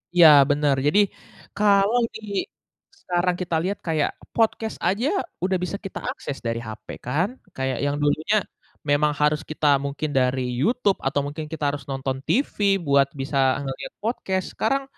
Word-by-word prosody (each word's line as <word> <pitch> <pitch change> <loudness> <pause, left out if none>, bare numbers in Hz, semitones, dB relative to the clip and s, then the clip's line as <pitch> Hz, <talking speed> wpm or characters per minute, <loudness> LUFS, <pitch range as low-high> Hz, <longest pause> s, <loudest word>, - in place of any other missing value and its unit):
Iya, 175 -2 +9 0.2
bener, 145 -1 +2
jadi 165 +8 +4 0.6
kalau 205 +3 +4
di - - -7 0.8
sekarang 180 0 0
kita 175 -2 -1
lihat 195 +2 -2
kayak 155 -2 +1 0.2
podcast 225 -1 +1
aja 205 +9 +1 0.4
udah 185 0 +2
bisa 200 - -3
kita 195 - -5
akses 140 - -6
dari 115 0 -1
HP 110 - -9 0.2
kan. 155 +10 +1 0.3
Kayak 130 -1 -1
yang 145 0 0
dulunya 155 +8 +2 0.5
memang 150 +1 +3
harus 150 +1 +3
kita 155 -1 0 0.2
mungkin 140 +2 -3
dari 130 0 +2 0.2
YouTube 215 - +2
atau 140 +1 +1
mungkin 150 +2 -5
kita 160 -2 -5
harus 145 -2 -5
nonton 135 -1 -2
TV 275 +4 +1 0.3
buat 140 -1 +4
bisa 140 0 -3 0.2
ngeliat 135 -1 -6
podcast, 190 -4 -1
sekarang 275 +5 0
155 Hz, 150 wpm, -24 LUFS, 140-195 Hz, 0.8 s, Iya